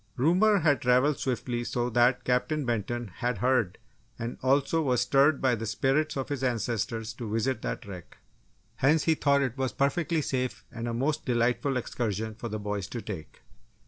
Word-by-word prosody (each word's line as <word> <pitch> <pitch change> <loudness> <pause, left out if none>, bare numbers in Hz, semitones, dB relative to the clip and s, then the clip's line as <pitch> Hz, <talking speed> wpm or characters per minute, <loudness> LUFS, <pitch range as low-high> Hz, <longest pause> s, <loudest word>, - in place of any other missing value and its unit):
Rumour 185 - +4
had 145 -6 +3
travelled 125 +4 +3
swiftly 120 -1 -2
so 120 0 -2
that 120 +2 +3
Captain 125 +4 0
Benton 120 0 -2
had 125 -2 -1
heard 125 -4 +1 0.4
and 115 +1 -5
also 140 +5 +2
was 125 -5 +1
stirred 140 +3 +4
by 130 -2 +2
the 115 -1 -3
spirits 135 +7 0
of 135 - -3
his 140 -2 -3
ancestors 115 -1 -1
to 110 -2 -6
visit 115 +2 0
that 125 - -4
wreck! 90 -4 -10 0.6
Hence, 150 +3 +3
he 160 - +3
thought 140 -2 +2
it 130 0 -3
was 130 -1 -1
perfectly 160 +3 0
safe 130 -2 -2
and 115 +1 -5
a 120 - -2
most 150 +5 0
delightful 125 +3 +1
excursion 110 -3 -3
for 115 +2 -6
the 110 - -3
boys 105 -2 -3
to 120 +3 -5
take! 90 -8 -8
125 Hz, 175 wpm, -28 LUFS, 115-140 Hz, 0.6 s, Rumour